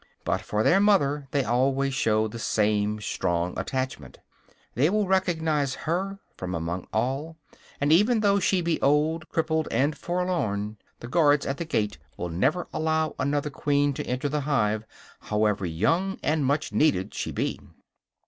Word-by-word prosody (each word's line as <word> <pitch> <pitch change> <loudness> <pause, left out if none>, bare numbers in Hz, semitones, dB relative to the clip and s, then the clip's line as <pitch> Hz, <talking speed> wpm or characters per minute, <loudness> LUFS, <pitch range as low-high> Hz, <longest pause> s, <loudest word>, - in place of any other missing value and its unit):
But - - 0
for 105 +1 -1
their 190 - +5
mother 150 -9 +2
they 140 +1 +1
always 135 +3 +1
show 110 -4 +2
the 115 +2 -8
same 105 -1 +1
strong 85 -3 -1
attachment. 130 - -4 0.6
They 140 +8 +3
will 210 0 +1
recognize 160 -7 +1
her 190 +5 -1 0.2
from 90 -1 -4
among 85 +2 -4
all; 135 +8 -2 0.4
and 145 +2 +3
even 215 +6 +4
though 200 -1 +3
she 190 -1 +2
be 170 -1 -1
old, 155 +3 +2
crippled 160 -1 0
and 140 +6 +1
forlorn, 140 - -2 0.2
the 120 - -7
guards 145 0 +3
at 135 - -2
the 170 - -4
gate 105 - -1 0.2
will 90 - -3
never 135 - 0
allow 160 0 0
another 145 +1 0
queen 145 +1 +1
to - - -5
enter 125 +3 -1
the 150 +1 -1
hive, 110 -7 0 0.3
however 105 -3 0
young 165 - 0
and 155 -3 +1
much 145 +2 0
needed 105 -11 +2
she - - -3
be. - - -2
140 Hz, 160 wpm, -26 LUFS, 110-160 Hz, 0.6 s, their